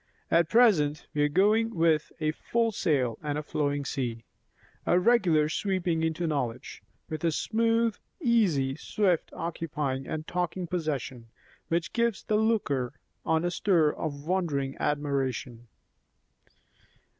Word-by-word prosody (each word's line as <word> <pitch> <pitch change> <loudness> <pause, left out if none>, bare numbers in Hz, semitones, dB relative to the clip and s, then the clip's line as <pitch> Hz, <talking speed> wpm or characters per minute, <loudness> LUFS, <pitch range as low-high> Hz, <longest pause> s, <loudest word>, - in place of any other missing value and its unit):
At 165 -1 +4
present 170 -11 +4
we 150 - 0
are 145 - +4
going 215 +7 +3
with 165 -2 +2
'a 155 -1 +1
full 230 +7 0
sail 130 - 0
and 150 -1 -2
a 150 - -3
flowing 145 -1 -1
sea'; 120 -5 -3 0.6
a 175 - +3
regular 180 -8 +3
sweeping 175 -1 -1
into 160 +1 -1
knowledge, 135 -7 -3 0.3
with 155 0 -5
a 165 - +3
smooth, 230 +4 +1 0.2
easy, 190 - +2
swift 185 0 0
occupying 150 -5 -3
and 155 0 -4
taking 180 0 -2
possession, 145 -8 -3 0.4
which 170 +1 -1
gives 235 -3 0
the 210 - +1
looker 195 - 0 0.3
on 160 +1 +2
a 175 - 0
stir 170 -5 +3
of 145 -2 -5
wondering 155 -7 -1
admiration. 135 -5 -2
160 Hz, 130 wpm, -28 LUFS, 145-190 Hz, 0.6 s, At